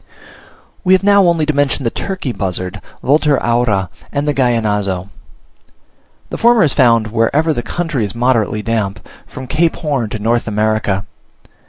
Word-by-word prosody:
We 185 - +4
have 190 - +3
now 200 -2 +5
only 165 -3 +2
to 155 - 0
mention 145 -1 0
the 115 - 0
turkey 185 -9 -4
buzzard 95 -1 -4 0.2
(Vultur 145 +1 +3
aura), 115 -6 0 0.2
and 145 +1 -2
the 150 - +2
Gallinazo. 105 -7 0 1.2
The - - -3
former 235 -2 +4
is 150 - +1
found 115 -5 +3
wherever 140 +8 +1
the 120 - -2
country 160 -3 -2
is 100 0 -4
moderately 115 -3 +1
damp, 110 -3 -2 0.2
from 130 - -8
Cape 160 +5 +1
Horn 140 -9 -2
to 110 - -4
North 115 +3 0
America. 105 -2 0
120 Hz, 155 wpm, -16 LUFS, 105-150 Hz, 1.2 s, now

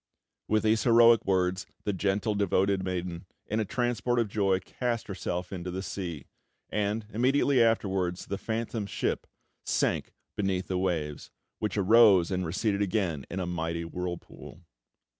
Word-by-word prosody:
With 110 0 +2
these 110 0 +3
heroic 115 -2 +6
words, 90 -1 +1 0.2
the 105 - -1
gentle, 100 +3 0
devoted 100 -1 +1
maiden, 90 -1 -4 0.2
in 110 - -1
a 110 - 0
transport 120 0 0
of 115 -3 +1
joy, 95 -2 +2
cast 120 +4 -3
herself 90 -2 -4
into 90 -1 -5
the 95 +2 -4
sea; 85 -9 -5 0.5
and, 105 +1 -1
immediately 130 +3 +3
afterwards, 95 -6 +1
the 100 - -4
phantom 110 -1 -3
ship - - -2 0.4
sank - - 0 0.2
beneath 95 -2 -1
the 90 -1 0
waves, 80 -6 -2 0.3
which 105 -1 -2
arose 100 -3 +6
and 90 -2 -1
receded 100 +4 0
again 90 -8 -1
in 95 - -4
a 90 - -1
mighty 85 -1 -3
whirlpool. 85 -1 -7
95 Hz, 145 wpm, -28 LUFS, 90-110 Hz, 0.5 s, heroic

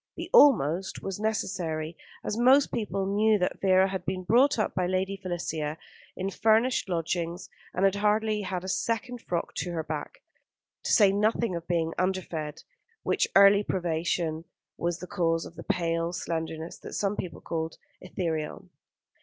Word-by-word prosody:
The - - -7
"almost" 190 - +4
was 195 0 -4
necessary, 175 -7 -2 0.3
as - - -2
most 260 +4 +5
people 195 -3 -2
knew 210 +2 +3
that 180 -2 -2
Vera 190 0 +5
had 190 -1 -4
been 185 +2 -3
brought 245 +9 +4
up 215 - -1
with 180 -1 0
Lady 190 +1 0
Felicia, 165 -5 -3 0.4
in 190 +1 -2
furnished 225 +2 +2
lodgings, 170 +1 -2 0.2
and 185 - +1
had 195 - +4
hardly 210 +1 +1
had 185 -2 -3
a - - -6
second 230 +5 -2
frock 170 -1 -3
to 175 - -2
her 160 -1 -2
back, 150 -1 -6 0.6
to - - 0
say 205 -4 +6
nothing 210 0 +1
of 170 0 -6
being 165 -2 0
underfed, 180 -5 -2 0.4
which - - +1
early 200 +1 +8
privation 170 -3 -1 0.3
was 170 0 -2
the 180 - -7
cause 165 -3 0
of - - -10
the 170 - -8
pale 170 -3 -1
slenderness 160 -1 -4
that - - -9
some 200 0 0
people 180 -4 -5
called 160 -1 -4 0.2
"ethereal." 165 -4 -4
185 Hz, 160 wpm, -28 LUFS, 165-205 Hz, 0.6 s, early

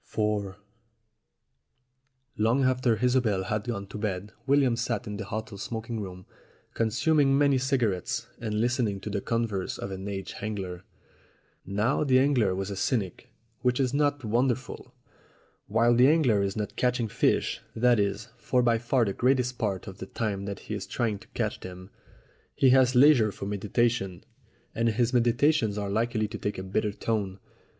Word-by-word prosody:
IV 105 -3 -1 1.8
LONG 115 +5 +2
after 130 -2 +2
Isobel 120 -7 +2
had 105 +2 -2
gone 100 -5 -3
to 105 - -8
bed 100 0 -3 0.2
William 135 -3 +4
sat 120 -1 -2
in 105 -2 -5
the - - -5
hotel 110 0 -5
smoking 115 +1 -4
room 90 -2 -7 0.5
consuming 135 +5 +2
many 140 -2 +3
cigarettes 120 -4 -1
and 105 -2 -2
listening 120 -4 0
to 105 - -5
the 100 -1 -2
converse 115 -5 -2
of 100 - -5
an 95 +1 -6
aged 95 -1 -5
angler. 95 -4 -4 0.8
Now 105 +9 +1
the 130 -3 +4
angler 130 -8 +3
was 95 +1 -3
a - - -4
cynic, 100 -1 -2 0.3
which 125 0 +1
is 130 -1 +1
not 145 -1 +1
wonderful. 125 +4 -1 0.8
While 115 +3 +3
the 125 +2 +6
angler 140 -10 +3
is 100 0 -1
not 105 -1 -4
catching 125 -2 +1
fish - - 0
that 120 0 +3
is, 100 +3 -1
for 125 -1 +1
by 115 -1 +3
far 120 +1 +1
the 100 - -2
greater 125 +1 +1
part 100 -5 -2
of 95 -2 -9
the 95 - -6
time 100 -3 -3
that 100 -1 -5
he - - -6
is 100 -2 -4
trying 110 -5 -1
to - - -17
catch - - -1
them 90 +1 -10 0.6
he 130 - +4
has 130 -1 +4
leisure 125 -5 +6
for 100 - -7
meditation, 105 -1 -1 0.5
and 115 0 +1
his 120 +2 0
meditations 120 -1 +2
are 100 -1 -2
likely 110 0 0
to 110 0 -7
take 105 - -3
a 95 - -4
bitter 105 +3 -1
tone. 100 -2 -2
110 Hz, 165 wpm, -27 LUFS, 100-125 Hz, 1.8 s, the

